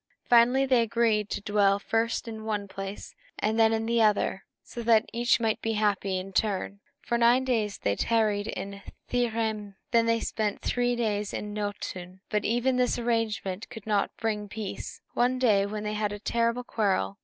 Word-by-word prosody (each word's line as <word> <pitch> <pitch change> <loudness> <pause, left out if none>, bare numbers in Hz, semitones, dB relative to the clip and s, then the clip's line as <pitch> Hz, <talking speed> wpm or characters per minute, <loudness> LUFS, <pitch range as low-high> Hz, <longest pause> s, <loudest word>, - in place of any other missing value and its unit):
Finally, 245 +3 +5
they 255 -3 +4
agreed 225 -2 +1
to - - -3
dwell 205 -1 +3
first 225 +3 -1
in 220 -1 -6
one 210 -2 -2
place, 195 +1 -7 0.3
then 220 +2 0
in 225 0 0
the 235 0 +2
other, 210 -3 +2 0.2
so 240 - -7
that 225 -1 +4
each 240 +2 +2
might 225 -2 0
be 225 - -1
happy 200 -3 0
in 190 +1 -6
turn. 200 0 -1 0.2
For 235 - -1
nine 240 +2 +5
days 225 -6 0
they 100 - 0
tarried 215 - +1
in 200 0 -6 0.3
Thrymheim, 230 -3 0
and 205 -1 -11 0.2
then 230 -1 +4
they 230 0 +3
spent 215 -2 -2
three 245 0 +1
in 210 -2 -2
Noatûn. 190 -3 -5
But 210 -1 0
even 245 +3 +1
this 250 -1 +2
arrangement 225 -4 -1
could 225 -3 -10
not 210 -2 +1
bring 210 -2 -2
peace. 210 -1 -6
One 250 +1 +2
day 215 -6 +3
they 210 +1 -4
had 210 -1 -1
a 205 - -4
terrible 235 +3 0
quarrel. 190 - -1
220 Hz, 175 wpm, -27 LUFS, 205-235 Hz, 0.3 s, Finally